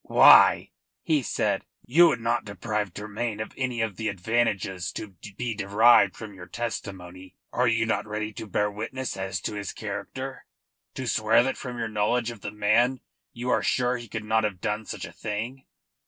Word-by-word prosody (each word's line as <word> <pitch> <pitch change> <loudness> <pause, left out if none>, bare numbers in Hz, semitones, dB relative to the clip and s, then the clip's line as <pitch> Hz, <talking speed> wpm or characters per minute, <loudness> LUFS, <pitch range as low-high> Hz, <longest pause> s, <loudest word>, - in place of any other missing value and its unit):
"Why," - - +7 0.3
he 155 -3 +2
said, 120 - -1 0.2
"you 170 +8 +6
would 125 -8 0
not 120 +2 0
deprive 105 0 -3
Tremayne 110 +3 -4
of 110 - -5
any 125 -3 -2
of 105 -5 -2
the 110 - -2
advantages 100 -3 -1
to 110 - -6 0.3
be 120 -2 -2
derived 100 0 +5
from 110 -2 -8
your 90 -2 -11
testimony? 95 -5 -6 0.2
Are 125 +1 +2
you 115 -1 +2
not 115 - -1
ready 105 0 -4
to 110 - -7
bear 105 +1 0
witness 115 +4 -4
as 95 -1 -3
to - - -3
his 100 -1 -4
character? 120 +6 -6 0.5
To 130 - -4
swear 115 0 +3
that 135 - -1
from 125 -2 -7
your 115 -1 -2
knowledge 110 +3 0
of 115 -3 -11
the - - -4
man 110 +5 +2 0.3
you 125 +1 -3
are - - +3
sure 125 0 +1
he 120 0 -9
could 110 0 -5
not 110 +1 +2
have 105 -4 -2
done 105 +3 -2
such - - -5
a - - -10
thing? 115 +5 -5
110 Hz, 185 wpm, -26 LUFS, 105-120 Hz, 0.5 s, Why